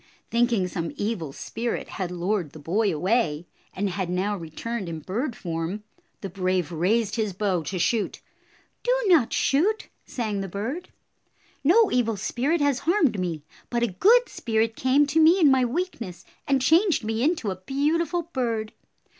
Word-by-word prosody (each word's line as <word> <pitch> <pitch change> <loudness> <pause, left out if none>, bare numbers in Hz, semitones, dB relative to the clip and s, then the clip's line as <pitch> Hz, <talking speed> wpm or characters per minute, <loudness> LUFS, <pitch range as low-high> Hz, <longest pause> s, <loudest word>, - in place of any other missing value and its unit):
Thinking 235 -5 +2
some 165 -3 -4
evil 205 -9 -2
spirit 230 - -4
had 185 -4 -4
lured 180 -2 -2
the - - -10
boy 195 +8 +1
away, 175 -2 0 0.3
and 200 +2 -2
had 190 -1 -3
now 190 +3 0
returned 190 +4 -5
in 165 - -4
bird 230 - -3
form, 170 +4 -4 0.4
the 195 - -4
brave 185 -2 -1
raised 205 +7 +1
his 215 -3 -1
bow 190 -2 0
to 185 +6 -3
shoot. 215 +4 0 0.6
"Do - - 0
not 330 - +4
shoot," 395 +11 +1
sang 215 -5 -3
the 195 - -4
bird. 225 - -4 0.7
"No 395 +9 +5
evil 235 -3 +1
58 195 - -6
spirit 290 +7 0
has 285 -2 +2
harmed 320 - +2
me, 170 -5 -3 0.3
but 240 -1 0
a - - +3
good 475 - +5
spirit 225 0 -1
came 265 +4 +3
to 290 +3 +1
me 325 +4 +6
in 300 -6 +6
my 260 -1 +4
weakness 240 - -3 0.2
and 270 -2 +2
changed 330 - +4
me 220 +1 -2
into 285 - +1
a - - -3
beautiful 330 +5 0
bird. 235 -8 -2
225 Hz, 165 wpm, -25 LUFS, 185-275 Hz, 0.7 s, me